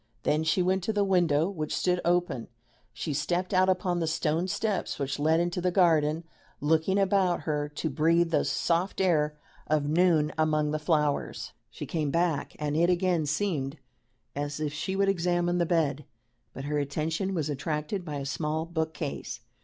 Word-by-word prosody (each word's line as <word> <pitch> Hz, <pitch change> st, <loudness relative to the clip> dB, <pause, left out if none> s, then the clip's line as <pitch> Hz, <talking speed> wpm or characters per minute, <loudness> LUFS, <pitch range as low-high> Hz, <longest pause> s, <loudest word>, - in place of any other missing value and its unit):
Then 155 Hz, +1 st, +1 dB
she 160 Hz, +3 st, +2 dB
went 185 Hz, +1 st, +1 dB
to 220 Hz, -, 0 dB
the 205 Hz, -1 st, +2 dB
window, 175 Hz, -5 st, +3 dB
which 155 Hz, -6 st, -3 dB
stood 180 Hz, -1 st, +1 dB
open; 175 Hz, -8 st, 0 dB, 0.4 s
she 120 Hz, +6 st, -4 dB
stepped 175 Hz, +6 st, -1 dB
out 185 Hz, 0 st, +4 dB
upon 180 Hz, -1 st, +1 dB
the 165 Hz, -, -1 dB
stone 160 Hz, +2 st, 0 dB
steps 210 Hz, +1 st, -1 dB
which 140 Hz, -1 st, -3 dB
led 160 Hz, +2 st, +3 dB
into 175 Hz, +1 st, -1 dB
the 180 Hz, -, +2 dB
garden, 165 Hz, -3 st, +3 dB, 0.4 s
looking 160 Hz, +6 st, +2 dB
about 190 Hz, -2 st, +2 dB
her, 150 Hz, -1 st, -2 dB
to 150 Hz, +2 st, -3 dB
breathe 165 Hz, +4 st, +2 dB
the -, -, +3 dB
soft 175 Hz, +3 st, 0 dB
air 155 Hz, -5 st, +2 dB, 0.3 s
of 150 Hz, -2 st, +1 dB
noon 160 Hz, -1 st, +3 dB
among 155 Hz, -1 st, +2 dB
the 155 Hz, -, -1 dB
flowers. 150 Hz, -2 st, 0 dB, 0.2 s
She -, -, -7 dB
came 155 Hz, -3 st, -1 dB
back, 165 Hz, -1 st, 0 dB
and 150 Hz, -1 st, -2 dB
it 170 Hz, +2 st, +3 dB
again 175 Hz, -3 st, +1 dB
seemed 150 Hz, -3 st, -1 dB, 0.6 s
as 145 Hz, +1 st, -3 dB
if 150 Hz, -1 st, -2 dB
she 170 Hz, +5 st, -3 dB
would 195 Hz, 0 st, +2 dB
examine 175 Hz, -1 st, +1 dB
the 170 Hz, -, +1 dB
bed, 150 Hz, -5 st, 0 dB, 0.5 s
but 135 Hz, -, -8 dB
her 150 Hz, +1 st, -1 dB
attention 160 Hz, +7 st, -2 dB
was 155 Hz, -4 st, -1 dB
attracted 150 Hz, +6 st, -3 dB
by 150 Hz, -4 st, -5 dB
a 140 Hz, -1 st, -4 dB
small 155 Hz, +3 st, -2 dB
book 160 Hz, -1 st, -3 dB
case. 145 Hz, -3 st, -5 dB
160 Hz, 175 wpm, -28 LUFS, 150-180 Hz, 0.6 s, out